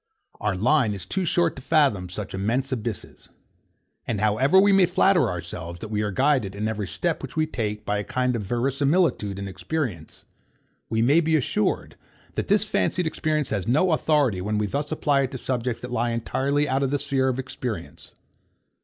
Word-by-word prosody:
Our 105 -2 0
line 115 +1 +2
is 95 -3 -7
too 190 - -2
short 170 0 +1
to - - -7
fathom 130 - +2
such 95 +2 -6
immense 115 +8 -1
abysses. 115 -4 -5 0.8
And 110 -4 -1
however 115 - +4
we 200 +1 +5
may 195 -2 +5
flatter 180 - +3
ourselves 85 -1 -6
that 110 - -7
we 105 -1 -1
are 105 - -1
guided, 130 -3 +1
in 105 +2 -2
every 105 -3 -3
step 170 - -2
which 135 - -8
we 155 0 +2
take, 105 -7 -4
by 105 0 0
a - - -2
kind 125 +3 0
of 115 - -2
verisimilitude 135 - +1
and 100 0 -5
experience, 95 - -4 0.6
we 110 0 +1
may 145 +7 +5
be 160 -1 +2
assured 125 -7 -1 0.4
that - - -3
this - - +3
fancied 135 - 0
experience 155 -2 -1
has 100 -1 -2
no 155 +9 +3
authority 145 - +2
when 105 +3 -1
we 105 - +1
thus 145 +8 -3
apply 145 -2 +2
it 130 - -2
to - - -3
subjects 125 -2 -3
that 125 - -6
lie 120 0 0
entirely 135 +5 0
out 135 0 0
of 135 - +1
the 145 - +1
sphere 140 -2 0
of 130 -1 0
experience. 125 -8 -6
125 Hz, 190 wpm, -24 LUFS, 105-150 Hz, 0.8 s, we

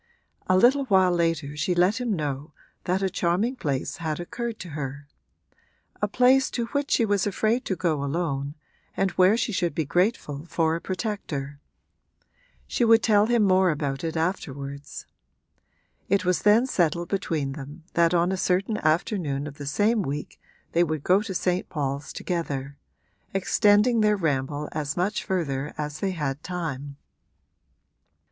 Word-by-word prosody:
A 185 - +4
little 265 +7 +4
while 190 -5 +4
later 165 -4 0
she 165 +5 0
let 185 +7 +2
him 245 -2 -1
know 150 -1 -4 0.3
that 185 +1 0
a - - +3
charming 185 +8 0
place 140 - -2
had 160 -2 -3
occurred 235 +5 -4
to 180 - -7
her 140 -1 -6 0.9
a - - +2
place 260 +2 +4
to 235 - -2
which 285 0 0
she 230 - +3
was 205 -2 +1
afraid 220 +5 0
to 190 - -1
go 160 -6 0
alone 140 -2 -2 0.4
and 195 -1 +1
where 185 +5 +4
she 230 - -1
should 175 -6 -1
be 160 - 0
grateful 175 - 0
for 165 -1 +1
a 165 - -4
protector: 170 -9 -4 1.1
she - - -1
would 225 0 +5
tell 210 -1 +4
him 235 -2 +3
more 185 -1 +4
about 145 -3 -2
it 165 0 -2
afterwards. 140 -5 -4 1.0
It 195 0 +2
was 180 0 +2
then 215 +4 +5
settled 170 - 0
between 165 -8 -1
them 145 +3 -9
that 170 -1 +3
on 175 +2 +2
a 190 - -1
certain 190 +4 0
afternoon 155 - 0
of 145 -1 -9
the 145 - -6
same 210 +9 +2
week 145 -3 -5 0.3
they 170 - +3
would 155 -3 -2
go 190 +3 +4
to 195 -3 -5
St. 180 +1 0
Paul's 140 -2 -3
together, 140 -6 -3 0.6
extending 210 +4 +4
their 210 -1 +3
ramble 145 -3 -1
as 150 0 -3
much 190 +4 0
further 150 -6 -2
as 150 0 -4
they 195 - 0
had 150 -6 -3
time. 145 -6 -5
175 Hz, 160 wpm, -25 LUFS, 145-200 Hz, 1.1 s, would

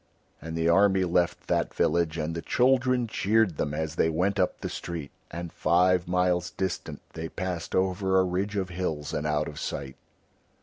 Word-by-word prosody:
And 80 0 -5
the 80 0 +1
army 95 +2 +4
left 90 0 +1
that - - 0
village 85 -1 +1
and 80 +1 -2
the 85 - -4
children 130 +1 +2
cheered 105 -4 +1
them 75 - -1
as 80 0 -2
they 80 - +3
went 95 +5 0
up 90 - 0
the - - -2
street, 85 -5 -5 0.2
and 85 0 -6
five 90 +2 +3
miles 90 -1 +1
distant 95 -2 -4
they 80 0 -5
passed 90 -2 -4
over 95 0 +2
a - - +4
ridge 95 +3 -1
of 95 -2 -1
hills 80 -5 -3
and 75 - -1
out 75 0 0
of 75 - -7
sight. 70 -2 -5
90 Hz, 180 wpm, -27 LUFS, 80-95 Hz, 0.2 s, army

